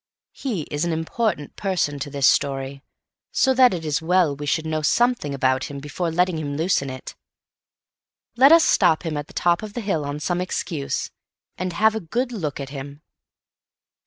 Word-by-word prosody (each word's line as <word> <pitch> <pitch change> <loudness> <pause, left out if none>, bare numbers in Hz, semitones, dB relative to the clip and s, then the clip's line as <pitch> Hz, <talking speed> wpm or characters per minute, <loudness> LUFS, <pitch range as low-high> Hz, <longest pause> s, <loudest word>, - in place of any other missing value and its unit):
He 220 - -3
is 145 +2 -1
an 170 - 0
important 160 0 -2
person 175 -7 -1
to 140 +1 -4
this 140 -1 0
story, 135 0 +1 0.5
so 265 - +3
that 255 -1 +6
it 170 -3 -4
is 150 -2 +1
as - - -5
well 170 -3 +2
we 145 +1 -6
should 160 +2 0
know 155 0 -1
something 235 - +1
about 130 -1 +1
him 140 - -7
before 150 +5 -3
letting 175 0 +1
him 145 -2 -4
loose 170 +1 +2
in 140 - -5
it. 130 -1 -8 1.2
Let 265 +4 +7
us 330 0 +8
stop 175 -3 +3
him 160 -2 -2
at 145 0 -4
the - - -15
top 175 -1 +2
of 215 -1 -7
the 240 - -4
hill 195 -8 -1
on 145 +1 -4
some 175 +3 -1
excuse, 165 -5 -3 0.4
and 185 -1 -3
have 220 +5 +3
a 220 - -2
good 240 +8 -2
look 160 - -4
at 135 -1 -5
him. 140 +1 -8
160 Hz, 195 wpm, -23 LUFS, 145-190 Hz, 1.2 s, us